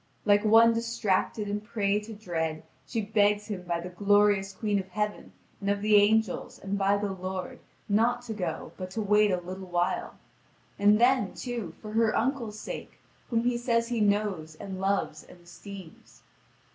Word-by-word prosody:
Like 205 0 +4
one 225 +2 +6
distracted 230 -2 -1
and 205 +1 -3
prey 210 -2 0
to 215 +1 -9
dread, 160 -6 -3 0.2
she 230 - -2
begs 205 0 +2
him 205 -4 -5
by 170 -1 -2
the 180 - -6
glorious 205 +1 +3
queen 205 +1 -1
of 190 - -6
heaven 210 +2 -3 0.3
and 200 - -2
of 200 0 0
the 210 0 +4
angels, 210 -1 +2
and 195 +1 -4
by 200 0 +2
the 205 -1 -2
Lord, 185 0 -5 0.3
not 235 +4 +2
to 225 - -5
go 200 -4 -4
but 185 -1 -5
to 190 - -5
wait 210 +1 +4
a 185 - +1
little 185 +2 -8
while; 175 0 -1 0.6
and 205 +1 +5
then, 245 -4 +3
too, 235 -10 -5
for 215 - -7
her 225 0 +2
uncle's 235 -4 -1
sake, - - -7 0.3
whom 230 -1 +1
he 240 0 +1
says 230 -1 +1
he 235 -2 -1
knows, 200 -6 0
and 190 +3 -7
loves, 195 -6 -1
and 180 - -16
esteems. 175 +1 -12
205 Hz, 175 wpm, -28 LUFS, 190-220 Hz, 0.6 s, one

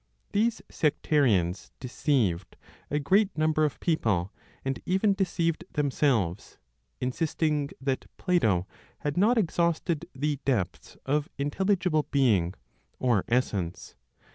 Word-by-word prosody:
These 225 +3 +1
sectarians 120 - +1
deceived 115 - 0 0.3
a 145 - 0
great 190 +8 +2
number 155 0 +2
of 150 - -3
people, 110 - 0 0.3
and 135 0 -2
even 195 +3 +2
deceived 175 -4 0
themselves, 130 - 0 0.4
insisting 150 +2 0
that 135 0 -2
Plato 110 - +2 0.4
had 145 -1 -2
not 220 +7 +4
exhausted 170 -3 0
the 145 +1 -1
depths 110 -11 -2
of 145 +2 0
intelligible 175 +2 +1
"being," 105 -11 +2 0.4
or 120 -7 +2
essence. 105 -8 -1
145 Hz, 105 wpm, -28 LUFS, 115-170 Hz, 0.4 s, not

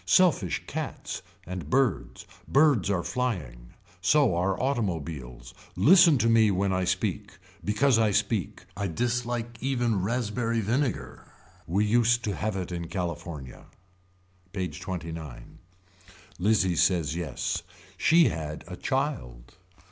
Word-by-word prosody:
Selfish 165 - +3
cats. - - -5 0.2
And 90 -4 -6
birds. 95 - 0 0.2
Birds 140 - +4
are 90 -4 0
flying. 75 - -4 0.3
So 140 +3 +4
are 90 +2 0
automobiles. 80 - -3 0.2
Listen 170 -2 +6
to 115 - +1
me 115 -2 +5
when 95 0 +1
I 95 0 0
speak. 100 +2 -2 0.3
Because 115 +4 +3
I 110 -1 +3
speak. 105 0 -1
I 100 +1 -2
dislike 120 +3 -2
even 120 -6 0
raspberry 115 +2 -1
vinegar. 110 - -2 0.4
We 100 +5 +1
used 120 +2 +3
to 105 - -1
have 110 -2 -2
it 90 -2 -4
in 85 -1 -4
California. 85 -6 -6 0.9
PAGE 90 -2 -4
XXIX. 80 -8 -6 1.0
Lizzie 95 -2 +2
says 85 -3 +2
yes. 80 -8 -3 0.3
She 165 -4 +5
had 80 -4 -5
a - - -7
child. - - -3
100 Hz, 120 wpm, -27 LUFS, 85-120 Hz, 1.0 s, Listen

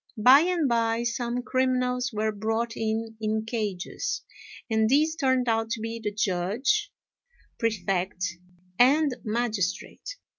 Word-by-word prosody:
By 255 +6 +8
and 340 -2 +1
by, 230 -1 +1
some 240 +1 -2
criminals 255 0 0
were 215 0 0
brought 225 +3 -2
in 225 0 -2
in 215 0 -1
cages, 225 - -3 0.4
and 220 -2 +2
these 305 +4 +3
turned 260 -5 +1
out 225 -1 +1
to 230 - -4
be 225 +1 -4
the 210 - -1
Judge, 210 - 0 0.7
Prefect, 190 -4 -1 0.5
and 280 +2 +4
Magistrate. 220 - -2
230 Hz, 120 wpm, -26 LUFS, 215-255 Hz, 0.7 s, By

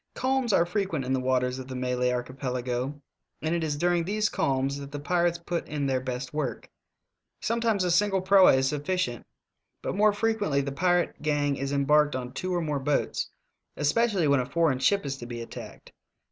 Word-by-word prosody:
Calms 260 -2 +1
are 175 -3 +4
frequent 175 -7 -2
in 130 - 0
the 130 - +1
waters 125 0 0
of 130 - -8
the 130 - -6
Malay 125 0 0
Archipelago, 125 +1 -3 0.4
and 160 +1 0
it 170 -1 0
is 150 -2 -1
during 175 +1 +2
these 210 +4 0
calms 135 +1 0
that 140 0 -8
the 145 - -5
pirates 175 +3 +1
put 170 0 -4
in 150 -2 -2
their 130 -1 0
best 130 +1 -5
work. 150 -4 -3 0.7
Sometimes 230 -3 0
a 180 - +1
single 195 +2 +3
proa 190 0 +6
is 130 0 +2
sufficient, 145 -3 -2 0.6
but - - -2
more 210 +1 +5
frequently 205 -8 0
the 140 0 -4
pirate 175 +4 +1
gang 145 -2 +1
is 135 0 -3
embarked 145 +1 +3
on 125 -1 -5
two 185 - -3
or 175 -1 0
more 150 -3 -1
boats, 140 +2 -1 0.5
especially 180 +3 +2
when 140 -1 +4
a 125 - -3
foreign 160 -6 +2
ship 200 +6 +2
is 135 -1 -3
to 120 - -8
be 120 -1 -6
attacked. 115 - -9
145 Hz, 190 wpm, -27 LUFS, 130-180 Hz, 0.7 s, proa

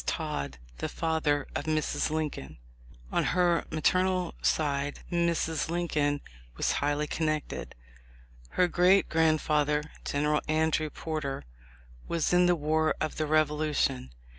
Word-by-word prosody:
Todd, 70 -2 -2 0.2
the - - -2
father 155 -3 0
of 145 - -3
Mrs. 155 -1 0
Lincoln. 150 - -3 0.5
On - - +2
her 175 -1 +2
maternal 185 +3 +1
side 145 -2 0
Mrs. 170 -2 0
Lincoln 150 -4 0 0.4
was - - +1
highly 145 +1 0
con 160 +1 -1
nected. 155 -1 -3 0.8
Her 180 - +5
great 180 +3 +4
grandfather, 150 -2 +2 0.2
General 150 +1 +1
Andrew 155 0 +1
Porter, 150 - -4 0.6
was 170 0 0
in 180 0 +5
the 175 - +4
war 155 0 +1
of 155 - -2
the 155 - -1
Revolution. 150 - +1
155 Hz, 120 wpm, -29 LUFS, 150-165 Hz, 0.8 s, Her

